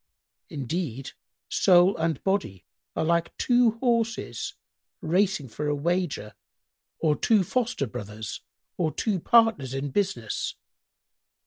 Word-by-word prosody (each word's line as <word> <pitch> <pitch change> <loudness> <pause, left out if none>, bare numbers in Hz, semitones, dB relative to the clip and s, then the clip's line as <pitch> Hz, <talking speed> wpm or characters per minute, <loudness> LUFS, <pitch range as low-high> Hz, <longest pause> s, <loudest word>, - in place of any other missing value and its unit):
Indeed, 135 -2 -4 0.4
soul 180 0 +5
and 165 0 -1
body 190 - -1 0.3
are - - 0
like 170 0 0
two 245 -2 +3
horses 230 -2 -1 0.4
racing 180 -3 +1
for 145 +6 -4
a 145 - +1
wager 155 - -1 0.6
or 155 -2 +2
two 215 +2 +3
foster 240 - -1
brothers 110 -2 -7 0.4
or 160 -3 +1
two 205 +1 -1
partners 220 - +3
in 135 +1 -3
business. 130 - -1
170 Hz, 110 wpm, -26 LUFS, 135-205 Hz, 0.6 s, soul